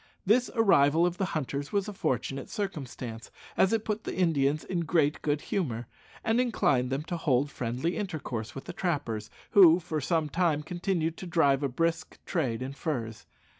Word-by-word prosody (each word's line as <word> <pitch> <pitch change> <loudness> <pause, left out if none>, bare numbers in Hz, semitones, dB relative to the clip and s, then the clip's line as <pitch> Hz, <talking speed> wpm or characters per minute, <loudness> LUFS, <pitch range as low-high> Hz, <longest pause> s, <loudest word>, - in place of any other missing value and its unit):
This 240 +6 +3
arrival 165 -7 +5
of 175 0 -1
the 195 - 0
hunters 140 0 -3
was 200 -1 0
a 210 - -5
fortunate 135 - -2
circumstance, 130 - -5 0.3
as 190 - +4
it 225 -1 0
put 215 +1 -2
the - - -4
Indians 155 -4 +2
in 180 - -2
great 155 -2 +1
good 145 0 0
humour, 125 - -2 0.4
and 225 +2 +2
inclined 175 - +1
them 135 +3 -2
to 170 +2 -4
hold 140 -3 +1
friendly 125 +8 -2
intercourse 135 - -4
with 135 - -6
the - - -7
trappers, 135 - -2 0.2
who 180 -4 +8
for 160 -3 -3
some 160 +2 +1
time 160 -1 +1
continued 170 -1 -1
to 185 - -7
drive 145 -5 +3
a 140 - 0
brisk 165 +6 -1
trade 130 -9 -1
in 135 +1 -5
furs. 120 -8 -4
155 Hz, 175 wpm, -29 LUFS, 135-180 Hz, 0.4 s, who